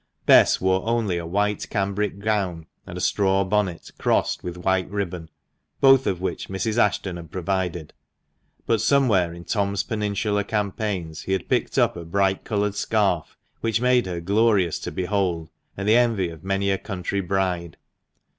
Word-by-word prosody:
Bess - - +6
wore 95 0 +1
only 110 -7 0
a 85 - -6
white 105 +3 -1
cambric 100 -1 -1
gown, 100 -6 -1 0.2
and 90 -2 -7
a - - -4
straw 95 +1 +2
bonnet 95 -3 -1
crossed - - +1
with 90 0 -5
white 95 +1 0
ribbon, 90 -5 -4 0.5
both 135 -1 +6
of 95 -3 0
which 95 - -4
Mrs. 105 +4 -1
Ashton 95 -4 +1
had 85 -2 -10
provided; 90 -2 -3 0.7
but 115 -2 +1
somewhere 115 -9 +3
in 85 0 -10
Tom's 100 0 -1
Peninsular 105 -1 -1
campaigns 100 -6 -3
he 95 - -2
had 95 - -2
picked - - 0
up - - +3
a 85 - -6
bright 95 +3 0
coloured 105 -2 -1
scarf, 100 -5 0 0.2
which 115 -1 0
made 125 -2 +3
her 85 -2 -4
glorious 100 -2 +2
to - - -5
behold, 90 -4 -1 0.3
and 100 +1 -3
the 110 +2 +6
envy 115 -7 +2
of 80 0 -11
many 95 +1 0
a 95 - 0
country 100 -1 -3
bride. 90 -3 -2
95 Hz, 165 wpm, -24 LUFS, 90-105 Hz, 0.7 s, Bess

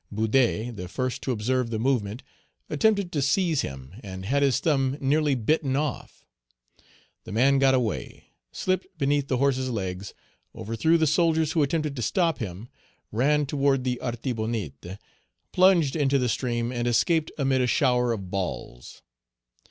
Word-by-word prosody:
Boudet, 110 +1 +1
the 90 -1 -6
first 130 +7 -3
to 130 - -2
observe 125 +2 0
the 115 - -2
movement, 115 -1 -1 0.5
attempted 200 +3 +2
to 145 - -1
seize 160 +2 +2
him, 65 +3 -7
and 95 -2 -7
had 140 +7 +1
his 135 -2 +3
thumb 135 -3 +1
nearly 145 +1 +2
bitten 135 +3 0
off. 145 -1 -4 1.0
The - - -10
man 135 +6 +3
got 135 -1 +4
away, 115 -6 -3 0.3
slipped 185 0 -1
beneath 145 -1 +1
the 130 - 0
horse's 130 -1 +1
legs, 95 -4 -4 0.4
overthrew 115 +10 +1
the 160 - +2
soldiers 160 0 +2
who 160 - +1
attempted 150 0 0
to 125 - -4
stop 165 - +1
him, 100 +1 -6 0.4
ran 145 +6 +2
toward 135 -2 +1
the 125 -1 -1
Artibonite, 110 - -4 0.5
plunged 180 -6 +4
into 140 -3 +2
the 125 -2 0
stream, 120 0 -1
and 120 -1 -2
escaped 155 +6 +2
amid 135 -2 +1
a 125 - +2
shower 125 -3 +2
of 100 -5 -5
balls. 90 -10 -5
130 Hz, 150 wpm, -26 LUFS, 115-145 Hz, 1.0 s, got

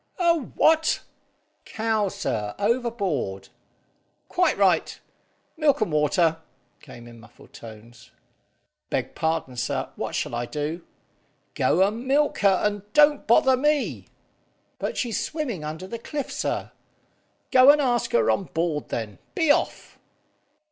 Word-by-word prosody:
"A 345 -3 +4
what?" 320 +1 +2 0.6
"Cow, 220 -2 -1
sir, 110 - -3
overboard." 200 - -1 0.8
"Quite 360 0 +1
right. - - +2 0.6
Milk 305 -3 +3
and 215 - 0
water," 155 +2 +2 0.4
came 120 0 -13
in 120 -1 -13
muffled 115 - -18
tones. 115 +1 -13 0.8
"Beg - - -2
pardon, 160 -5 -2
sir, - - -2
what - - -4
shall - - -2
I 120 0 -3
do?" 155 +5 -4 0.7
"Go 185 +3 +3
and 230 +5 -5
milk 290 +2 +2
her, 195 -2 +3
and 205 -1 0
don't 295 -1 +4
bother 260 +3 +5
me." 295 +2 0 0.7
"But - - -3
she's 230 -6 -1
swimming 260 - -4
under 155 +4 -6
the 230 +5 -7
cliff, 290 +4 -5
sir." - - -3 0.8
"Go 255 +1 +7
and 295 +1 +7
ask 245 -4 0
her 480 -2 +3
on 195 - -1
board, 165 -3 -2
then. 105 -5 -5 0.2
Be 320 -4 +3
off!" - - -1
205 Hz, 130 wpm, -24 LUFS, -, 0.8 s, Go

